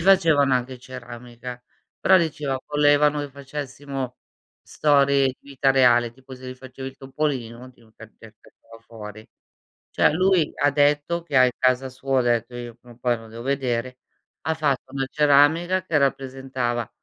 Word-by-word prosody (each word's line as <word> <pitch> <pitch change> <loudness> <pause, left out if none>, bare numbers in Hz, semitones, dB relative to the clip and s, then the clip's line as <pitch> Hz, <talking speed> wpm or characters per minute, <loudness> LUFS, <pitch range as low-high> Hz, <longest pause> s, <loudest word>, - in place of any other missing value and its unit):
facevano 165 -7 +4
anche 125 0 -2
ceramica. 125 0 -9 0.4
Però 190 - +6
diceva, 150 -5 -1
volevano 145 0 +3
che 145 - -5
facessimo 135 -1 -6 0.5
storie 140 -2 +3
di 130 0 -3
vita 135 -1 0
reale. 120 -3 +4
Tipo 130 +1 -13
se 130 0 -10
gli 130 - -7
facevi 130 +1 -9
il 135 - -14
topolino 130 -3 -4
ti 125 - -24
caccia 110 0 -15
cacciava 115 0 -18
fuori. 110 -1 -11 0.6
Cioè, - - +3
lui 185 -1 +2
ha 145 - +2
detto 145 +4 +1
che 150 -5 0
hai 130 -1 +5
casa 130 +1 +1
sua, 130 +1 -1
ho - - +3
detto: 120 0 0
"Io 120 -1 -7
prima 120 0 -17
o - - -26
poi 120 -1 +1
lo 115 0 -13
devo 115 +1 -10
vedere", 130 -2 -2 0.4
ha 160 - -1
fatto 140 -4 -1
una 135 -1 -1
ceramica 155 +5 +3
che 165 -4 0
rappresentava, 130 -4 -2
135 Hz, 160 wpm, -23 LUFS, 125-145 Hz, 0.6 s, Però